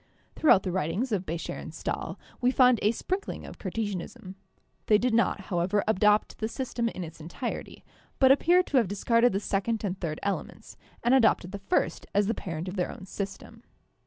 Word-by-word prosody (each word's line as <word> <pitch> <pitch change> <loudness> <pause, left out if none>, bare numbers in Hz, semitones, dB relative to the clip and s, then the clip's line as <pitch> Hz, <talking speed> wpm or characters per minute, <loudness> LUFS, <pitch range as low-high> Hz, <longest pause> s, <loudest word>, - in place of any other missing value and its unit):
Throughout 250 -11 +5
the 185 - -2
writings 185 - -1
of 195 -3 -1
Becher 165 +2 -3
and - - -7
Stahl - - -4 0.2
we 250 - +4
find 255 -3 +5
a 210 - +3
sprinkling 375 - -4
of - - -11
Cartesianism; 200 0 -4 0.5
they 210 - +6
did 245 +2 0
not, 230 -2 +2
however, 185 +2 0
adopt 210 0 +3
the 220 - -1
system 235 0 -2
in 185 - -6
its 160 -1 -9
entirety, 175 - -6 0.3
but 265 -1 +6
appear 345 +6 +5
to 290 - 0
have 235 -5 +4
discarded 230 +5 +3
the 195 - 0
second 210 +3 -1
and 190 -2 -2
third 155 -3 -3
elements, 200 -1 -4 0.3
and 240 +2 +3
adopted 225 -8 +3
the 200 - -6
first 360 - -1
as 205 0 +4
the 225 - +1
parent 170 -4 -5
of 185 +2 -5
their 180 - 0
own 185 - -10
system. 200 +4 -7
210 Hz, 190 wpm, -28 LUFS, 185-235 Hz, 0.5 s, they